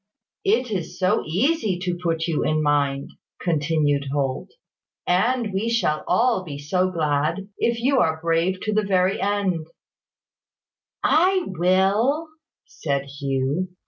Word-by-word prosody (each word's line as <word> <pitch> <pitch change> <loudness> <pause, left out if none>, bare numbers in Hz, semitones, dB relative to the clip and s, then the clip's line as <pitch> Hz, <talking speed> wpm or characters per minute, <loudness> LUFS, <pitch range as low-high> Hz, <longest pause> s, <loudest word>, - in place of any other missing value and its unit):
"It 390 - +2
is 180 -6 -4
so 185 +3 +2
easy 215 - +1
to 180 -1 -1
put 165 -2 0
you 165 -3 0
in 155 0 +1
mind," 140 -2 0 0.3
continued 150 -4 0
Holt; 135 -2 -2 0.6
"and 225 +4 +1
we 205 +4 0
shall 220 -10 0
all 235 -5 +2
be 145 -5 -7
so 180 +6 0
glad 160 +3 -1
if 235 0 +1
you 265 +3 +2
are 160 -6 +1
brave 165 +3 0
to 215 - -1
the 215 - +3
very 190 -1 +1
end 195 -5 0 0.7
" - - -70 0.6
"I 370 +3 +3
will," 195 - +1 0.4
said 140 -3 -2 0.2
Hugh. 140 +6 -1
180 Hz, 135 wpm, -23 LUFS, 155-215 Hz, 0.7 s, the